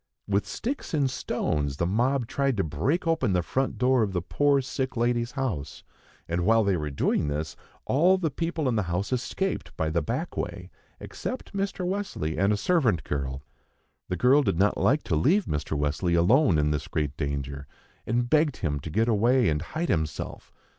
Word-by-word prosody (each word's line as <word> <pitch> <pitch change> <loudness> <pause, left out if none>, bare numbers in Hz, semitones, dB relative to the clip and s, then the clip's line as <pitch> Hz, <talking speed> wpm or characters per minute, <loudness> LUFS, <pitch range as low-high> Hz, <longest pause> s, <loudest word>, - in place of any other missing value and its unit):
With 100 0 0
sticks 260 - -4
and 140 -3 +1
stones 70 - -2
the 85 - 0
mob 120 +7 +1
tried 135 0 0
to 95 - +2
break 90 - -1
open 160 - +1
the 90 -1 +1
front 130 +11 -1
door 125 0 +3
of 100 -3 0
the 90 - 0
poor 145 +7 +2
sick 130 -1 -3
lady's 120 +1 0
house; 110 - -3 0.4
and 85 +1 -1
while 115 +3 +4
they 100 -2 +2
were 75 -3 -2
doing 70 +1 0
this, 75 +2 -3 0.3
all 175 +8 +4
the 165 -5 -1
people 165 0 -2
in 125 - +1
the 105 - +2
house 95 +7 -1
escaped 130 +10 -2
by 80 -1 0
the 85 +1 +1
backway, 125 - -4 0.3
except 255 -4 -6
Mr. 195 -2 -2
Wesley 185 - -2
and 100 +2 +3
a 105 - +2
servant 120 - +2
girl. 70 -2 -3 0.7
The 90 - -1
girl 130 - +5
did 105 - 0
not 100 +3 +3
like 145 +4 +2
to 80 - -1
leave 180 - +3
Mr. 75 0 -2
Wesley 75 +4 0
alone 95 - +4
in 75 0 +2
this 75 -2 -2
great 75 -2 -2
danger, 70 -1 -4 0.4
and 120 +2 +1
begged 150 0 +2
him 75 -4 -2
to 75 - -7
get 110 +8 +1
away 120 +1 +3
and 75 -1 0
hide 160 - -3
himself. 80 -5 -3
110 Hz, 190 wpm, -27 LUFS, -, 0.7 s, girl